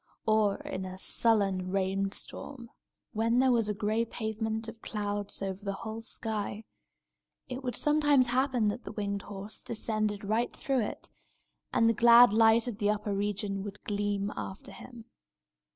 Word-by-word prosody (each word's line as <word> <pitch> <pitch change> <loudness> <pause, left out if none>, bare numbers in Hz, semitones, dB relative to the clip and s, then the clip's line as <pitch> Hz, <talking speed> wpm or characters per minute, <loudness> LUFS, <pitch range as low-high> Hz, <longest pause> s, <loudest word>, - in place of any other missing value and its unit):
Or, 215 -2 +3
in 185 - -5
a 185 0 -7
sullen 195 -3 +2
rain 195 +1 0
storm, 235 +3 -5 0.4
when 230 +2 +1
there 260 0 +4
was 230 -3 +2
a - - +1
gray 215 +2 0
pavement 220 0 -3
of 225 0 -9
clouds 205 -1 -3
over 195 +1 -4
the 200 -1 -2
whole 220 +1 -5
sky, 220 -2 -4 0.8
it 255 +1 -6
would 250 -1 -2
sometimes 295 -3 +3
happen 250 -3 +1
that 235 +4 -4
the - - -8
winged 200 -1 -2
horse 200 +1 -5
descended 215 -2 -2
right 220 +4 0
through 270 -2 0
it, 210 - -5 0.6
and 230 - +3
the 230 - +4
glad 235 0 +7
light 225 +1 +5
of 225 -3 -5
the 205 -2 +2
upper 210 -1 -1
region 200 0 -2
would 205 0 -8
gleam 205 0 -1
after 190 +1 -7
him. 230 +3 -11
215 Hz, 160 wpm, -30 LUFS, 200-230 Hz, 0.8 s, glad